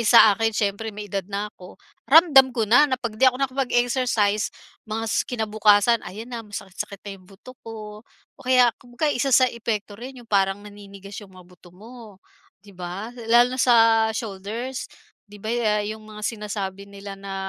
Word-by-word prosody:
sa 220 -1 +7
akin 225 0 0
siyempre 205 +1 -1
may 205 0 -8
edad 195 -1 -3
na 205 +1 -3
ako 180 0 -15 0.3
ramdam 280 -4 +7
ko 225 -4 -1
na 245 +6 +6
na 260 - 0
'pag 230 -4 -5
'di 265 - +3
ako 255 +1 -4
nakapag-exercise 245 -5 0 0.4
mga 225 +1 -3 0.2
kinabukasan 215 -1 +3
ayan 215 +6 -8
na 230 -1 -5
masakit-sakit 200 -1 -7
na 200 - -6
'yong 185 - -21
buto 230 +6 -15
ko 215 -1 -9 0.3
o - - -21
kaya 250 -1 +5
kumbaga 245 +6 -3
1 265 +2 -1
sa 255 +1 +6
epekto 215 -3 -4
rin 255 +3 -9
'yong 235 - -18
parang 195 0 +1
naninigas 200 -1 -12
'yong 200 -2 -14
mga 185 -1 -15
buto 180 0 -18
mo 220 0 -14 0.5
'di 200 - -14
ba, 185 +6 -6 0.2
lalo 245 +2 +5
na 260 - -2
sa 245 -2 +5 0.4
shoulders 225 +4 -5 0.4
'di 205 0 -13
ba 220 +3 -4
ya 210 -3 +1
'yong 220 +1 -6
mga 215 0 -11
sinasabi 200 -3 -5
nila 200 0 -9
na 195 0 -8
215 Hz, 180 wpm, -23 LUFS, 200-240 Hz, 0.5 s, sa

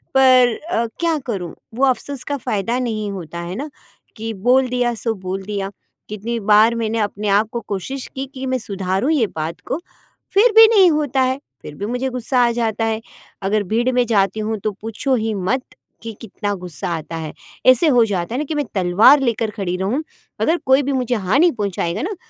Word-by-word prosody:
पर 255 -3 +6 0.2
अ, 235 -9 +1
क्या 335 -2 +1
करूँ 195 -8 -4 0.2
वो 265 +3 +3
अफ़सोस 265 +1 -1
का 285 0 -1
फ़ायदा 220 0 -1
नहीं 215 -4 -2
होता 170 -3 -7
है 170 +2 -5
ना, 285 +6 -5 0.5
कि 225 +1 -4
बोल 250 +6 +3
दिया 245 -1 0
सो 225 +1 -1
बोल 190 0 -5
दिया। 200 -1 -4 0.4
कितनी 220 +3 -3
बार 215 +2 +5
मैंने 225 -1 -1
अपने 210 0 -2
आप 210 +2 +3
को 235 - -2
कोशिश 235 +7 -4
की, 270 +1 -3
कि 265 0 -7
मैं 260 0 0
सुधारूँ 195 +5 -1
ये 250 -8 +2
बात 160 +1 -4
को, 280 - -2 0.5
फिर 440 +5 +5
भी 450 0 +11
नहीं 380 -3 +7
होता 290 -4 +1
है, 260 +1 +1 0.2
फिर 150 - -9
भी 200 - -5
मुझे 250 +4 -2
गुस्सा 250 +1 -1
आ 235 - +2
जाता 225 -1 -1
है। 220 0 -1 0.4
अगर 205 +2 +1
भीड़ 230 +6 0
में 245 -1 +3
जाती 200 -2 +2
हूँ 215 +1 -2
तो 215 - 0
पूछो 225 +5 -1
ही 220 -2 -1
मत 200 +7 -1 0.4
कि 225 - -5
कितना 205 -1 -4
गुस्सा 180 -1 -6
आता 165 +1 -6
है, 155 -2 -6 0.3
ऐसे 255 +5 +6
हो 245 -5 +5
जाता 195 +1 -2
है - - -1
ना 300 - -2
कि 310 - -3
मैं 290 - 0
तलवार 195 +10 +6
लेकर 230 -4 0
खड़ी 195 -4 -3
रहूँ, 210 +11 -1 0.4
अगर 330 - +3
कोई 265 +2 +4
भी 280 - -1
मुझे 250 -2 0
हानि 240 - +3
पहुँचाएगा 200 - -2
ना 400 +5 -3
225 Hz, 205 wpm, -20 LUFS, 200-260 Hz, 0.5 s, भी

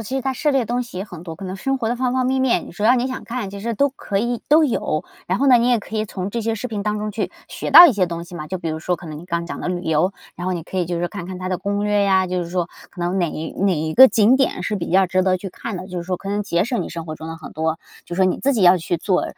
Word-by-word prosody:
其 225 +4 -5
实 270 - -1
它 265 0 0
涉 295 +3 0
猎 270 - +3
的 235 - -3
东 245 +2 -1
西 235 - -11
也 - - -2
很 180 -4 -10
多， 165 -2 -6
可 195 - -9
能 185 +1 -5
生 270 +7 -1
活 235 -4 -2
的 240 - -1
方 250 0 0
方 255 -1 +1
面 265 +1 +1
面， 255 -9 +1
只 205 +5 -4
要 245 +3 +6
你 250 +1 0
想 260 - -6
看， 230 -4 -4
其 200 - -8
实 230 +2 -3
都 280 +7 +3
可 215 -6 -5
以 240 +2 -1
都 310 +2 +6
有。 230 - 0 0.2
然 185 +6 -1
后 275 - +4
呢 250 - +8
你 240 +1 +2
也 240 -3 +3
可 220 - -7
以 215 - 0
从 190 -1 -5
这 235 - -2
些 225 0 -1
视 245 +3 -5
频 210 -2 -4
当 210 0 -1
中 210 0 -3
去 215 +1 -3 0.2
学 - - -5
到 350 - +12
一 - - +3
些 190 -4 +1
东 170 0 -5
西 175 0 -10
嘛， 150 - -6
就 185 +2 -4
比 165 - -4
如 155 - -3
说 180 +2 -1
可 170 -1 -10
能 150 -1 -7
你 170 - -10
刚 170 -1 -2
讲 - - -6
的 - - -4
旅 180 -1 -2
游， 160 +4 +1 0.2
然 175 - -5
后 185 - 0
你 170 -2 -3
可 190 - -8
以 175 - 0
就 175 -1 -2
是 175 - -1
看 180 -4 -7
看 185 0 -6
它 185 0 -5
的 185 -1 -1
攻 200 +1 -2
略 205 -1 +2
呀， 190 -1 +3
就 180 -1 -1
是 - - -8
说 175 -1 -1 0.2
可 180 - -10
能 175 +2 0
哪 175 - +1
一 160 +1 -5
哪 195 -2 +3
一 155 +1 -2
个 260 +7 +10
景 230 +2 +4
点 270 - 0
是 210 - -1
比 170 -2 -4
较 190 +1 +5
值 185 +1 +2
得 185 -1 +3
去 190 +1 -7
看 220 +2 -6
的， 185 +1 -7
就 180 -2 -4
是 170 - -5
说 185 +1 -2
可 195 - -8
能 205 0 -1
节 170 -3 +1
省 240 +2 -1
你 - - -4
生 165 -1 -6
活 155 -1 -6
中 160 - -8
的 165 0 -6
很 160 - -10
多 160 +1 -2 0.2
就 175 - -6
是 190 - +2
说 - - +5
你 185 - +1
自 280 - +1
己 220 -7 +1
要 180 +1 +7
去 175 0 -2
做 180 +2 0
195 Hz, 380 characters per minute, -21 LUFS, 175-230 Hz, 0.2 s, 到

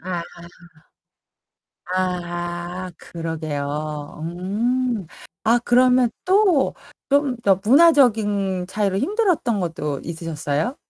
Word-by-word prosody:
아. 175 -1 -3 1.7
아, 175 0 -3
그러게요. 150 -2 -5
음. 210 +6 -1 0.4
아 230 +2 +4
그러면 250 0 +4
또 370 -6 +3 0.4
좀 280 -2 +2
더 195 -3 +3
문화적인 215 - +4
차이로 195 -1 0
힘들었던 330 - +1
것도 150 -5 -3
있으셨어요? 165 - -3
190 Hz, 175 characters per minute, -22 LUFS, 170-250 Hz, 1.7 s, 아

